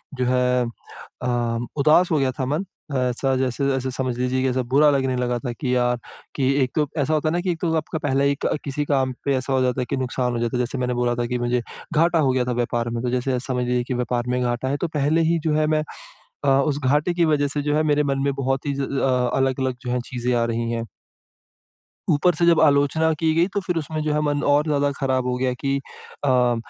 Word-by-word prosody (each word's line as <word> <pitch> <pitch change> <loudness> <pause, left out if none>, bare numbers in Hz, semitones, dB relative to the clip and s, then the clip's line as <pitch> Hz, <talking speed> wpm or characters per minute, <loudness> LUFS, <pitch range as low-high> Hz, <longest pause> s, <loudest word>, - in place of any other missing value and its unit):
जो 125 - -1
है 125 0 +2
अ, 120 +1 -10 0.5
उदास 155 +5 +4
हो 155 - +3
गया 130 -1 +1
था 130 - 0
मन। 150 +8 -1 0.3
ऐसा 130 +1 0
जैसे 130 +1 -1
ऐसे 130 0 -2
समझ 125 -2 -2
लीजिए 125 +1 0
की - - +2
ऐसा 130 +1 0
बुरा 150 +2 +6
लगने 130 -2 +1
लगा 125 -1 0
था 125 -2 -4
कि 125 +1 -1
यार, 125 0 +2 0.4
कि 140 - -1 0.2
एक 125 - -2
तो 150 -2 +2
ऐसा 145 +1 +1
होता 155 0 +1
है - - -1
ना 175 - +1
कि 185 -1 0
एक 165 - -4
तो 165 -2 0
आपका 160 0 -3
पहले 140 -1 +2
ही 140 0 +2
क - - +1
किसी 145 +1 -2
काम 135 -2 +1
पे 140 - +2
ऐसा 130 +1 -2
हो 130 - +2
जाता 125 0 +1
है - - -1
कि - - -1
नुकसान 125 -1 -1
हो 120 - -2
जाता 120 +1 -1
है - - -1
जैसे 130 +3 -4
मैंने 125 -1 -1
बोला 120 0 +1
था 120 - -1
कि 125 0 -1
मुझे 120 0 0 0.3
घाटा 165 +1 +3
हो 135 -4 +3
गया 125 -1 +1
था 125 - -2
व्यापार 120 0 -1
में 115 0 -3
तो 125 - 0
जैसे 125 0 0
समझ 125 -1 -2
लीजिए 125 0 0
की 125 - -4
व्यापार 120 0 -1
में 125 0 0
घाटा 120 +1 -1
है 140 - 0
तो 175 - +1
पहले 150 +3 +2
ही 170 -1 +2
जो 155 - +1
है 155 0 +2
मैं, 155 0 +1 0.6
अ, - - +1
उस 145 -1 0
घाटे 150 +6 +2
की 170 -1 +2
वज़ह 145 -2 +2
से 145 - +1
जो 150 +1 0
है 155 - +3
मेरे 150 +1 +3
मन 135 - -1
में 140 - +1
बहुत 135 +1 -2
ही 140 - 0
ज 140 - -4
अ - - +1
अ, 125 -3 +1
अलग-अलग 130 -1 0
जो - - -1
है 125 - 0
चीज़ें 125 -1 -1
आ 115 -1 +2
रही 115 0 -2
है। 115 0 -2 1.3
ऊपर 170 +4 +3
से 170 +2 +2
जब 170 -2 +5
आलोचना 150 +2 +3
की 160 -1 +2
गई, 170 +2 +3
तो 205 - +1
फिर 180 -2 -2
उसमें 155 0 -3
जो 150 -1 0
है, 150 - +1
मन 145 -1 0
और 145 +1 +3
ज़्यादा 145 -1 +1
खराब 130 -2 0
हो 125 - 0
गया 130 0 0
कि 135 +2 -1 0.5
अ, 125 -2 +3
130 Hz, 260 wpm, -23 LUFS, 125-150 Hz, 1.3 s, बुरा